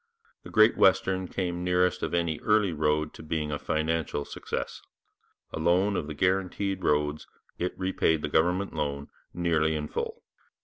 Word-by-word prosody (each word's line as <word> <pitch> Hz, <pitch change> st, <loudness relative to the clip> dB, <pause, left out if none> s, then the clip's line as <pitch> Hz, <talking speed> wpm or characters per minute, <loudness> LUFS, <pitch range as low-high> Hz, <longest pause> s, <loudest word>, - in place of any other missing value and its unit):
The -, -, -11 dB
Great 110 Hz, 0 st, +5 dB
Western 95 Hz, -1 st, +3 dB
came 90 Hz, -2 st, -3 dB
nearest 90 Hz, 0 st, +2 dB
of -, -, -1 dB
any 85 Hz, -3 st, 0 dB
early 105 Hz, -4 st, +2 dB
road 75 Hz, 0 st, 0 dB
to -, -, -11 dB
being 75 Hz, -1 st, -2 dB
a 75 Hz, -, -2 dB
financial 80 Hz, -2 st, -1 dB
success; -, -, -5 dB, 0.7 s
alone 90 Hz, +5 st, +2 dB
of 75 Hz, -, -2 dB
the 75 Hz, -, -6 dB
guaranteed 95 Hz, +2 st, 0 dB
roads 75 Hz, 0 st, 0 dB, 0.3 s
it 90 Hz, +1 st, -2 dB
repaid 95 Hz, -4 st, +1 dB
the -, -, 0 dB
government 90 Hz, +6 st, +1 dB
loan, 70 Hz, -1 st, -3 dB, 0.2 s
nearly 80 Hz, -3 st, +1 dB
in 75 Hz, -1 st, -3 dB
full. -, -, -4 dB
85 Hz, 150 wpm, -28 LUFS, 75-95 Hz, 0.7 s, Great